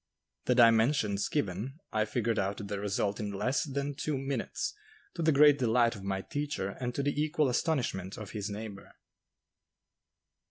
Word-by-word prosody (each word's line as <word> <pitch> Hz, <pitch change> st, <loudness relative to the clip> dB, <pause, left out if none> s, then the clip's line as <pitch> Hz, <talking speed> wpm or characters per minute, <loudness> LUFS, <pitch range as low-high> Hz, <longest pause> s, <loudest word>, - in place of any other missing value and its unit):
The 125 Hz, -, +3 dB
dimensions 115 Hz, -3 st, +4 dB
given, 115 Hz, -, -2 dB, 0.2 s
I 110 Hz, -1 st, +2 dB
figured 115 Hz, 0 st, 0 dB
out 100 Hz, +1 st, -2 dB
the 100 Hz, 0 st, -3 dB
result 100 Hz, 0 st, -1 dB
in 105 Hz, -2 st, -3 dB
less 125 Hz, +10 st, 0 dB
than 140 Hz, 0 st, -2 dB
two 145 Hz, +1 st, -2 dB
minutes, 135 Hz, +1 st, -2 dB, 0.4 s
to 170 Hz, -, -4 dB
the 160 Hz, -1 st, +4 dB
great 145 Hz, 0 st, +6 dB
delight 120 Hz, -1 st, +3 dB
of 100 Hz, -, -9 dB
my 95 Hz, 0 st, -2 dB
teacher 145 Hz, -9 st, -3 dB
and 125 Hz, +4 st, -4 dB
to 140 Hz, -, 0 dB
the 145 Hz, +1 st, 0 dB
equal 150 Hz, -2 st, +2 dB
astonishment 120 Hz, -, -1 dB
of 110 Hz, -3 st, -7 dB
his 105 Hz, -1 st, -4 dB
neighbor. 105 Hz, -1 st, -7 dB
115 Hz, 160 wpm, -31 LUFS, 100-140 Hz, 0.4 s, great